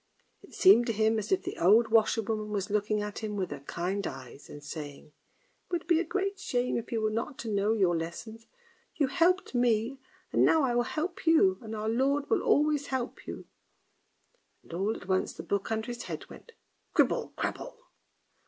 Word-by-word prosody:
It - - -15
seemed 315 -11 +6
to 230 - 0
him 220 +1 +2
as 210 - -6
if 385 - +2
the - - -6
old 215 +7 +5
washerwoman 220 -1 +1
was 200 -1 -3
looking 210 0 0
at 210 0 -5
him 215 -1 -4
with 190 -5 -2
her 145 - -5
kind 180 +7 -3
eyes 130 +2 -10
and 145 - -10
saying: 145 0 -8 0.3
" - - -41
It - - -40
would 345 -2 -2
be 335 -2 +3
a - - +1
great 390 +3 -2
shame 250 -10 -1
if 235 - -4
you 230 -2 0
were 215 0 +1
not 230 +5 -3
to 225 - -5
know 205 +2 +2
your 190 -6 +2
lesson. 170 +7 -5 0.6
You 290 - +2
helped 345 +8 +2
me, 245 +1 +1 0.3
and - - +4
now 320 -2 +4
I 250 -3 +1
will 240 - +3
help 340 +2 -4
you, 195 -13 +5
and 220 -1 -6
Our 215 0 -3
Lord 275 +5 +1
will - - +3
always 295 -1 +2
help 260 -2 -4
you." - - -7 1.2
And - - -13
all 200 +6 0
at 180 - -10
once 190 -1 0
the - - -8
book 200 +2 -2
under 220 0 -1
his 240 -1 -6
head - - -6
went 465 - -13 0.2
" - - -45
cribble, - - +2
crabble." - - -4
225 Hz, 205 wpm, -29 LUFS, 200-275 Hz, 1.2 s, seemed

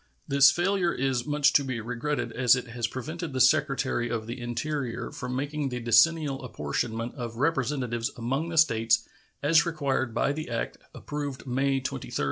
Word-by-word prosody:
This 140 0 +7
failure 175 +2 +1
is 130 -1 -1
much 150 0 +3
to 145 - +4
be 130 -3 -3
regretted, 120 +3 -3
as 125 +1 +4
it 125 - -4
has 115 0 -2
prevented 155 +6 -6
the 130 - -2
Secretary 135 -3 +2
of 110 -2 -3
the 120 +2 -6
Interior 125 0 -3
from 125 -4 -5
making 145 +1 -2
the 125 -1 -4
decennial 135 +5 +3
apportionment 115 +4 -3
of 120 -2 -6
Representatives 130 -5 0
among 135 +8 -2
the 165 - -4
States, 115 -6 +3 0.4
as 155 +3 +5
required 140 -7 -1
by 140 - +2
the 155 -2 -5
act 115 -1 -3 0.2
approved 145 -3 -5
May 135 +1 0
23, 130 - -3
1850. - - -11
130 Hz, 170 wpm, -27 LUFS, 120-150 Hz, 0.4 s, This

